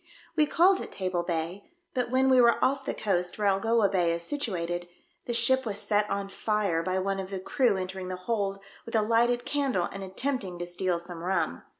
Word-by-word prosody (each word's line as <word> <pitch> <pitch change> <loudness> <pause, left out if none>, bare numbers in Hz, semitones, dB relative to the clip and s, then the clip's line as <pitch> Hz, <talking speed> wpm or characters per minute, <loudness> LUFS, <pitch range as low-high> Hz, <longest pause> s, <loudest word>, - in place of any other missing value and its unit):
We 305 -2 +4
called 370 +5 +4
at - - -7
Table 185 -2 -1
Bay, 170 +2 -3 0.3
but 250 -2 -1
when 260 +1 +3
we 260 -1 +6
were 235 -1 +5
off 270 +1 0
the - - -1
coast 180 -4 -1
where 210 - -1
Algoa 220 +2 +3
Bay 180 -3 +1
is 170 0 -2
situated, 175 - -2 0.4
the 240 - -2
ship 260 +3 +3
was 210 -4 -3
set 210 0 +1
on 200 0 -2
fire 200 -4 0
by 185 +2 -1
one 195 +1 -1
of 190 -1 -5
the 195 -1 -4
crew 220 +2 +1
entering 185 0 -4
the 185 - -3
hold 195 +1 -2 0.3
with 230 - -6
a 220 - +4
lighted 240 +2 +2
candle 270 -11 0
and 195 0 -6
attempting 195 -1 -2
to 175 - -4
steal 175 0 -1
some 170 -1 -8
rum. 175 - -1
195 Hz, 210 wpm, -28 LUFS, 180-235 Hz, 0.4 s, we